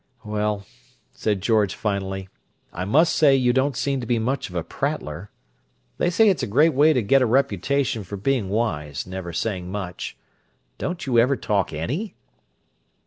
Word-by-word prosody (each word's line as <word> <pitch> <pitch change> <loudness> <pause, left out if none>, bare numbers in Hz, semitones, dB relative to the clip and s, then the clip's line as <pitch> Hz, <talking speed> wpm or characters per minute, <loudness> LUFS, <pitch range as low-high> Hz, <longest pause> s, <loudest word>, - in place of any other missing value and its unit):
"Well," 105 -1 -1 0.5
said 105 -3 -1
George 105 -2 +2
finally, 95 -2 -3 0.5
"I 90 - -3
must 155 - +3
say 140 -3 +5
you 125 -2 +3
don't 130 0 +1
seem 135 -2 -1
to 120 - -6
be 120 - +2
much 125 +3 -1
of 90 - -11
a 85 - -1
prattler. 100 - -4 0.7
They - - +2
say 220 +5 +4
it's 190 -4 +3
a - - -1
great 150 +10 +4
way 150 +4 +5
to 125 -6 +1
get 135 +7 +4
a 125 - +3
reputation 135 -1 +1
for 100 +2 -7
being 110 -1 0
wise, 75 - -2
never 95 -1 -6
saying 90 0 -3
much. 95 -3 -5 0.6
Don't 175 -1 -3
you 125 -4 +3
ever 130 +4 +4
talk 100 -3 0
_any? 140 - -3
110 Hz, 170 wpm, -23 LUFS, 95-135 Hz, 0.7 s, say